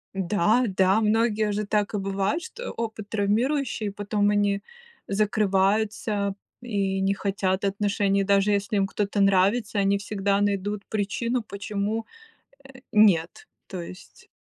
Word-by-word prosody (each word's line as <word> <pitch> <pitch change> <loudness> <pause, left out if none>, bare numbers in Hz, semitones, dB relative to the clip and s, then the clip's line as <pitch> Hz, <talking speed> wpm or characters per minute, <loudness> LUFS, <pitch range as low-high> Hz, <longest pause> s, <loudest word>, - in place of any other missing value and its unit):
Да, 205 +5 +2
да, 190 +1 +2
многие 215 -1 +2
же 210 +1 -2
так 210 +1 0
и - - +1
бывает, 195 - -1
что 480 +6 -7
опыт 220 -2 -5
травмирующий, 220 +2 0
потом 205 0 0
они 205 -1 +1 0.5
закрываются 205 0 +1 0.3
и 200 -5 -1
не 195 +1 +1
хотят 195 -1 -1
отношений. 200 0 +1
Даже 200 +1 +3
если 205 +2 0
им 195 - +2
кто-то 200 +1 -1
нравится, 200 +3 +2
они 200 0 +2
всегда 200 -1 -1
найдут 205 0 -1
причину, 230 +4 -1
почему, 205 +1 -3 0.7
э, 260 - -13
нет, 210 - +3 0.2
то 185 - -5
есть. 180 +3 -12
205 Hz, 130 wpm, -25 LUFS, 195-215 Hz, 0.7 s, Даже